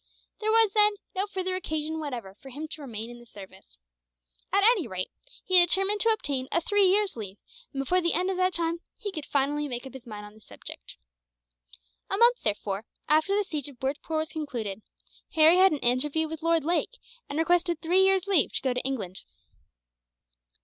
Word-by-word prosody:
There 430 - -1
was, 445 -2 +5
then, 420 -1 +5 0.2
no 390 +2 0
further 375 -2 -2
occasion 315 -3 -3
whatever 245 -10 -6
for 270 +7 -14
him 295 +5 -6
to 310 - -8
remain 230 -4 -6
in 240 - -11
the 240 - -15
service. 190 - -14 0.7
At 395 +1 +3
any 420 - +4
rate, 185 -3 -4 0.3
he 370 -1 +5
determined 385 +4 +3
to 455 - +3
obtain 280 -12 0
a - - +3
three 410 +3 +2
years' 400 +1 +2
leave; 205 -3 -7 0.3
and 275 - -6
before 360 +7 +1
the 340 -1 +1
end 370 +1 +1
of 375 - -3
that 370 0 +1
time, 335 0 0 0.2
he 410 - -5
could 310 -6 -7
finally 290 +2 0
make 245 -1 -5
up 265 - -10
his 265 -2 -11
mind 210 -2 -8
on 210 - -13
the 215 - -19
subject. - - -11 1.1
A 390 - 0
month, 475 +2 +5
therefore, 205 0 -2 0.2
after 310 +6 +3
the 415 - +2
siege 305 -8 -4
of 270 -4 -12
Bhurtpoor 285 +4 -3
was 315 0 -2
concluded, 235 -10 -4 0.5
Harry 320 +2 +8
had 380 +1 +6
an 305 - 0
interview 280 +6 +1
with 320 0 -7
Lord 330 -1 +2
Lake, 350 +10 -1 0.3
and 285 - -4
requested 345 0 +2
three 355 +4 +3
years' 385 -1 +3
leave 390 -8 +2
to - - -1
go 260 -2 +1
to 250 - -2
England. 205 -9 -4
315 Hz, 200 wpm, -27 LUFS, 255-375 Hz, 1.1 s, Harry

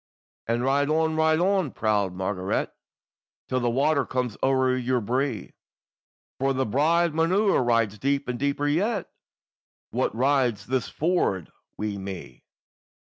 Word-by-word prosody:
"And 115 +1 0
ride 140 +2 +2
on, 160 0 +1
ride 160 0 +3
on, 190 -3 +2
proud 105 -3 0
Margaret! 95 0 -2 0.7
Till 130 - 0
the 120 -1 +1
water 140 +4 +2
comes 125 -4 -2
o'er 130 -1 +2
your 130 0 0
bree, 125 0 -2 0.9
For 135 +1 +1
the 130 0 0
bride 160 +8 +2
maun 165 +2 +1
ride 120 - +2
deep, 140 +4 0
and 125 -1 -3
deeper 140 +1 0
yet, 195 +7 0 0.8
Wha - - +1
rides 125 -2 +1
this 130 -3 -1
ford 155 - 0 0.3
wi' 105 -1 -3
me. 95 -2 -8
130 Hz, 135 wpm, -25 LUFS, 115-155 Hz, 0.9 s, ride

